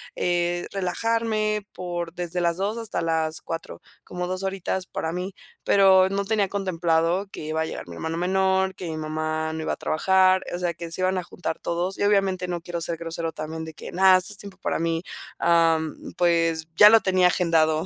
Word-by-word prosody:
eh, 175 Hz, 0 st, 0 dB
relajarme 215 Hz, +2 st, -1 dB
por 175 Hz, -2 st, -4 dB
desde 175 Hz, 0 st, -3 dB
las 170 Hz, -1 st, +1 dB
14:00 205 Hz, +4 st, -1 dB
hasta 225 Hz, -6 st, -3 dB
las 160 Hz, -1 st, -1 dB
16:00, 165 Hz, 0 st, -6 dB, 0.2 s
como 180 Hz, 0 st, -4 dB
2 185 Hz, +1 st, -3 dB
horitas 190 Hz, -1 st, -2 dB
para 160 Hz, -, -3 dB
mí, 180 Hz, +2 st, -4 dB, 0.3 s
pero 190 Hz, -1 st, +6 dB
no 200 Hz, +1 st, -1 dB
tenía 205 Hz, -2 st, +1 dB
contemplado 175 Hz, -1 st, 0 dB
que -, -, -8 dB
iba 155 Hz, +1 st, -1 dB
a -, -, 0 dB
llegar 160 Hz, -, -7 dB
mi 85 Hz, -, -8 dB
hermano 160 Hz, -, -4 dB
menor, 190 Hz, +1 st, +1 dB
que 180 Hz, -, -6 dB
mi 160 Hz, -, -4 dB
mamá 155 Hz, 0 st, -2 dB
no 160 Hz, -, -4 dB
iba -, -, -1 dB
a -, -, -2 dB
trabajar, 185 Hz, +3 st, +3 dB
o -, -, -4 dB
sea, 175 Hz, -1 st, -1 dB
que 170 Hz, 0 st, -8 dB
se 175 Hz, -, -3 dB
iban 185 Hz, 0 st, +1 dB
a 180 Hz, -, -2 dB
juntar 175 Hz, -1 st, -5 dB
todos 175 Hz, +3 st, -2 dB
y -, -, 0 dB
obviamente 195 Hz, -3 st, +2 dB
no 175 Hz, -1 st, -3 dB
quiero 170 Hz, 0 st, -5 dB
ser 170 Hz, 0 st, -3 dB
grosero 165 Hz, 0 st, -4 dB
también 160 Hz, +1 st, -5 dB
de 160 Hz, -, -8 dB
que: -, -, -9 dB
"¡Nada! 185 Hz, 0 st, +6 dB
Esto 185 Hz, +3 st, -4 dB
es 200 Hz, -, -10 dB
tiempo 200 Hz, -1 st, -10 dB
para -, -, -2 dB
mí". 165 Hz, 0 st, -1 dB, 0.4 s
Am, 165 Hz, -2 st, +1 dB
pues 165 Hz, -2 st, +2 dB
ya 210 Hz, -, +10 dB
lo 225 Hz, +1 st, +7 dB
tenía 185 Hz, -2 st, +3 dB
agendado, 160 Hz, -2 st, +2 dB
175 Hz, 205 wpm, -24 LUFS, 165-190 Hz, 0.4 s, ya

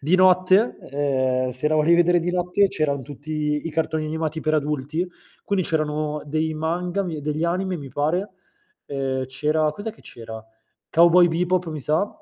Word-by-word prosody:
di 155 Hz, +6 st, +1 dB
notte, 185 Hz, +4 st, +4 dB
ehm, 130 Hz, -2 st, 0 dB
se 130 Hz, +4 st, -2 dB
la 155 Hz, -, +1 dB
volevi 155 Hz, +2 st, +4 dB
vedere 175 Hz, 0 st, +4 dB
di 175 Hz, +2 st, -1 dB
notte, 180 Hz, +3 st, +2 dB
c'eran 145 Hz, -5 st, -1 dB
tutti 150 Hz, +2 st, -3 dB
i 165 Hz, -, -3 dB
cartoni 160 Hz, 0 st, -1 dB
animati 160 Hz, 0 st, -3 dB
per 155 Hz, 0 st, 0 dB
adulti, 150 Hz, +2 st, -1 dB, 0.4 s
quindi 195 Hz, -3 st, 0 dB
c'erano 150 Hz, -1 st, -1 dB
dei 155 Hz, +2 st, -1 dB
manga 175 Hz, +4 st, -1 dB
mi 165 Hz, -5 st, -4 dB
degli 150 Hz, +2 st, -2 dB
anime 180 Hz, +2 st, 0 dB
mi 140 Hz, -4 st, -8 dB
pare, 165 Hz, +9 st, -1 dB, 0.6 s
ehm, 135 Hz, -2 st, -2 dB
c'era 150 Hz, +4 st, 0 dB
cos'è 205 Hz, +8 st, -5 dB
che -, -, -21 dB
c'era? 110 Hz, -1 st, -9 dB, 0.5 s
Cowboy 170 Hz, +1 st, +6 dB
Bebop 180 Hz, +2 st, 0 dB
mi 155 Hz, -1 st, -5 dB
sa, 155 Hz, +8 st, +1 dB
155 Hz, 165 wpm, -23 LUFS, 145-175 Hz, 0.6 s, Cowboy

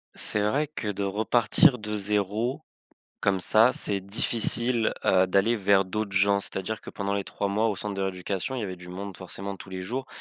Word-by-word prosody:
C'est 105 Hz, -1 st, 0 dB
vrai 145 Hz, +6 st, +1 dB
que 145 Hz, -7 st, -6 dB
de 100 Hz, 0 st, -3 dB
repartir 115 Hz, -, +3 dB
de 105 Hz, 0 st, -4 dB
0 105 Hz, +7 st, -1 dB, 0.6 s
comme 95 Hz, -2 st, +1 dB
ça, 110 Hz, +6 st, +5 dB
c'est 100 Hz, -6 st, 0 dB
difficile, 115 Hz, +3 st, +1 dB
heu, 95 Hz, 0 st, +4 dB
d'aller 100 Hz, +5 st, +2 dB
vers 100 Hz, -1 st, +3 dB
d'autres 100 Hz, +1 st, -3 dB
gens, 100 Hz, +1 st, +4 dB
c'est-à-dire 100 Hz, +2 st, -4 dB
que -, -, -12 dB
pendant 100 Hz, 0 st, -3 dB
les 100 Hz, -1 st, -2 dB
3 100 Hz, -, -3 dB
mois 110 Hz, +3 st, +1 dB
au 105 Hz, -, 0 dB
centre 105 Hz, +2 st, -4 dB
de 100 Hz, -, -4 dB
rééducation, 95 Hz, +5 st, -3 dB
il 125 Hz, -, -3 dB
y -, -, -3 dB
avait 95 Hz, -2 st, -5 dB
du 90 Hz, 0 st, -12 dB
monde 95 Hz, +1 st, -7 dB
forcément 95 Hz, +1 st, -6 dB
tous 95 Hz, -, -12 dB
les 95 Hz, 0 st, -5 dB
jours. 130 Hz, +8 st, -4 dB
100 Hz, 205 wpm, -26 LUFS, 95-110 Hz, 0.6 s, ça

